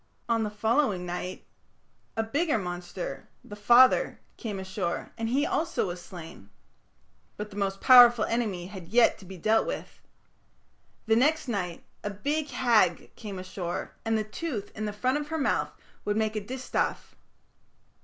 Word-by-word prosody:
On 230 -1 +2
the 215 - -1
following 210 -2 +1
night 180 +1 -5 0.7
a 225 - +2
bigger 290 +5 +1
monster, 180 -1 -5
"the 205 - -9
father", 240 +5 +5 0.2
came 210 -4 -5
ashore, 190 -2 -3
and 225 0 -3
he 275 +5 +2
also 335 +2 0
was 175 -1 -5
slain. 165 - -11 0.9
But 210 0 -6
the - - -11
most 195 -1 -2
powerful 240 -3 +8
enemy 210 -7 -1
had 185 -2 -9
yet 230 +4 +4
to 195 - -13
be 190 0 -9
dealt 215 +6 +2
with. - - -6 1.0
"The 220 0 +3
next 300 +5 +2
night 185 -7 -3 0.2
a 205 - -2
Big 290 +9 -2
Hag 215 -9 +2
came 205 -3 -7
ashore, 185 -1 -5
and 225 0 +1
the 215 - 0
tooth 215 -1 -5
in 215 - -3
the 210 - -2
front 255 +7 0
of 295 - -5
her 320 +1 -3
mouth 280 - +1 0.3
would 210 0 -1
make 220 0 0
a 215 - -1
distaff. 255 +5 -3
215 Hz, 160 wpm, -28 LUFS, 190-245 Hz, 1.0 s, powerful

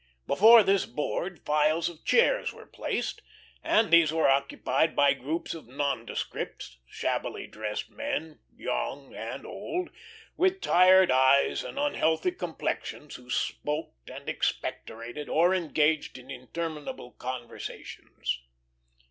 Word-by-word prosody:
Before 220 +8 +7
this 195 -1 +2
board 175 +4 -4
files 150 +2 +2
of 170 -2 -8
chairs - - +3
were - - -13
placed, - - -3 0.4
and 220 -1 +3
these 165 -2 +7
were 160 0 +2
occupied 140 +3 +1
by 140 -1 +5
groups 145 +5 -4
of 165 -7 -10
nondescripts, 130 - -4
shabbily - - -3
dressed 105 -1 -5
men, 280 - -4 0.2
young - - -3
and - - -6
old, 360 0 -4 0.4
with 375 +1 +2
tired 185 - +6
eyes 130 +2 +4
and - - -8
unhealthy 285 - +1
complexions, 150 - -4
who 125 0 -17
smoked 150 - -3
and - - -10
expectorated, 120 +6 -3
or 175 +4 +4
engaged 155 -5 +1
in 130 +1 -11
interminable 150 - -6
conversations. 120 - -6
155 Hz, 115 wpm, -28 LUFS, 135-185 Hz, 0.4 s, Before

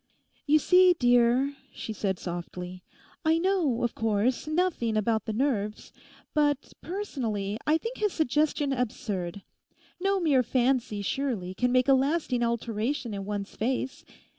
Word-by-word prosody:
'You 300 +2 +6
see, 360 +4 +6
dear,' 245 +2 +3 0.2
she 220 - -6
said 195 -2 -1
softly, 180 +1 -6 0.4
'I 320 0 +3
know, 335 -9 +1
of 240 - 0
course, 225 +5 0
nothing 310 -9 0
about 220 0 +1
the - - -2
nerves; 215 -4 -1 0.4
but 295 -2 +1
personally, 230 - -3
I 310 +1 +4
think 460 +8 -6
his 420 -2 +1
suggestion 295 -2 +1
absurd. 200 -7 -3 0.6
No 390 +1 +1
mere 295 -7 +3
fancy, 245 -4 0
surely, 220 -7 -2
can 245 +5 0
make 255 +1 +3
a 275 - +6
lasting 270 -2 +1
alteration 235 +1 -1
in 195 -1 -4
one's 205 -1 -4
face. 260 +4 -2
250 Hz, 140 wpm, -28 LUFS, 215-295 Hz, 0.6 s, You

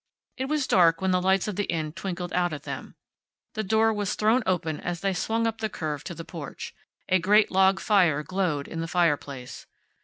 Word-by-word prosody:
It 260 - -3
was 300 0 0
dark 170 -7 +4
when 190 0 0
the 180 0 +2
lights 190 +1 +2
of 205 -3 -4
the 205 - 0
Inn 160 -2 -2
twinkled 180 -1 -5
out 175 -2 +1
at 145 -1 -6
them. - - -7 0.6
The 220 - -2
door 220 +2 +3
was 205 -2 -2
thrown 220 +4 +3
open 165 -4 -1
as 175 -1 -4
they 195 -1 0
swung 225 +5 -1
up 225 0 -2
the 220 - -2
curve 150 -6 -4
to 175 - -6
the 165 - -8
porch. 160 -5 -8 0.3
A 185 - +3
great 205 +5 +4
log 190 0 +4
fire 175 -9 +3
glowed 175 -6 -1
in 165 - -6
the 165 - -3
fireplace. 145 -7 -1
185 Hz, 210 wpm, -26 LUFS, 165-205 Hz, 0.6 s, dark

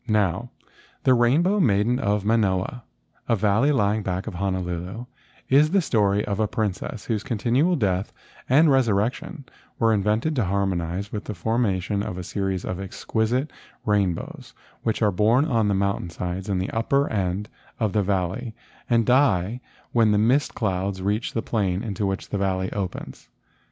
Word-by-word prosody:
Now 105 +2 +1 0.5
the 130 - +5
Rainbow 150 - +3
Maiden 115 - +2
of 105 -4 0
Manoa, 105 +1 +1 0.5
a 115 - +4
valley 110 +7 +2
lying 105 -5 +2
back 95 -1 -3
of 110 - -5
Honolulu, 95 +3 -3 0.4
is 145 +3 +5
the 195 +3 +3
story 105 -6 +2
of 100 0 -2
a 110 - +2
princess 105 +1 -3
whose 110 -4 -1
continual 125 - +1
death 95 - 0 0.4
and 145 +4 +5
resurrection 125 - 0 0.3
were 115 -1 +3
invented 110 +9 +1
to 120 - +2
harmonize 95 0 -1
with 105 - -5
the 105 - -5
formation 100 -1 0
of 90 -3 -4
a 90 - -5
series 95 0 -2
of 90 - -4
exquisite 110 - -1 0.3
rainbows 100 -5 -1 0.3
which 110 0 -1
are 105 - +4
born 110 +9 +3
on 115 -8 +1
the 100 - +2
mountain 100 -2 -1
sides 90 +3 -5
in 95 - +1
the 95 +1 -2
upper 140 +5 +1
end 95 0 -1 0.3
of 110 -4 0
the 105 - +3
valley 100 +4 -2 0.3
and 115 -2 +3
die 125 -4 +2 0.3
when 115 -2 +4
the 105 - +3
mist 125 +7 +2
clouds 95 -2 -1
reach 105 +5 -1
the 115 - -1
plain 100 -3 -1
into 105 -2 -2
which 95 0 -3
the 100 - -2
valley 95 -1 -1
opens. 95 -3 -5
105 Hz, 160 wpm, -24 LUFS, 95-120 Hz, 0.5 s, the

